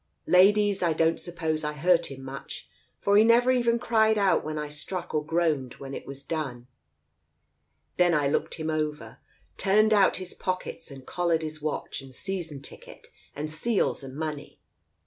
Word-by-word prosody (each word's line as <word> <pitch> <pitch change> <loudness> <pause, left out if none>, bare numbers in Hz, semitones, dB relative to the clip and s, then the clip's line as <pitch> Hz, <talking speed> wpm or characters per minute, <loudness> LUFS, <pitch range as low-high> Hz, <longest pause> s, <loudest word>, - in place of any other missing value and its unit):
Ladies, 200 +3 +4
I 170 -2 +2
don't 165 +1 +2
suppose 160 -3 -3
I 150 0 -2
hurt 170 +3 +2
him 135 -1 -9
much, 135 +1 -8 0.3
for 200 0 +4
he 215 - +7
never 240 +2 +5
even 240 -2 +2
cried 220 -2 +2
out 200 -2 +3
when 155 0 -4
I 150 0 -3
struck 150 +5 -5
or 155 -1 +1
groaned 155 -5 0
when 135 0 -9
it - - -7
was 140 0 -9
done. 135 -6 -4 1.3
Then 175 -2 +4
I 145 -2 +2
looked 140 - 0
him 160 -1 -3
over, 155 -1 -3 0.4
turned 215 +2 +4
out 200 -2 +4
his 185 -1 -7
pockets 185 -2 -4
and 135 -2 -11
collared 170 -2 0
his 155 -1 -6
watch 150 -2 -3
and 135 -1 -14
season 165 -5 -5
ticket - - -11 0.3
and 150 +2 -4
seals 200 +8 0
and 135 0 -9
money. 150 -1 -5
160 Hz, 170 wpm, -27 LUFS, 150-190 Hz, 1.3 s, he